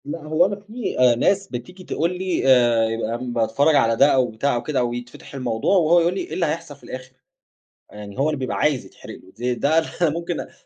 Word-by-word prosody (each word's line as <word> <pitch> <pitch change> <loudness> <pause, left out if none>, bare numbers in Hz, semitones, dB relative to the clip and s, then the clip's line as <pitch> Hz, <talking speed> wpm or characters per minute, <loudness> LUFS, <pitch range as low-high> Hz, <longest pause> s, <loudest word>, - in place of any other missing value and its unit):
لأ 150 +2 -6
هو 155 +1 +2
أنا 200 +1 -1
في 210 +3 -6 0.2
ناس 195 +5 +2
بتيجي 180 +9 -8
تقول 175 +1 -2
لي، 185 -6 -1
آآ 120 -3 +5
يبقى 115 0 -2
باتفرّج 135 +6 +2
على 115 -4 +3
ده 135 +5 +5
أو 130 -2 +3
بتاع 120 +5 0
أو 120 - -2
كده 145 +1 -1
أو 120 -1 0
يتفتح 120 +3 -9
الموضوع، 125 - 0
وهو 170 0 +4
يقول 170 +1 +1
لي: 190 - -3
"إيه - - -7
اللي 175 - 0
هيحصل 155 -1 -4
في 140 - -26
الآخر؟" 130 0 -9 0.8
يعني 105 0 -10
هو 140 +3 +2
اللي 150 - -3
بيبقى 130 -1 -3
عايز 150 -4 +1
يتحرق - - -12
له، 95 - -16
ز 120 - -14 0.2
ده 155 +3 +2
أنا 165 0 0
ممكن 170 +2 -3
أ - - -3
اللي - - -14
145 Hz, 230 wpm, -22 LUFS, 120-170 Hz, 0.8 s, آآ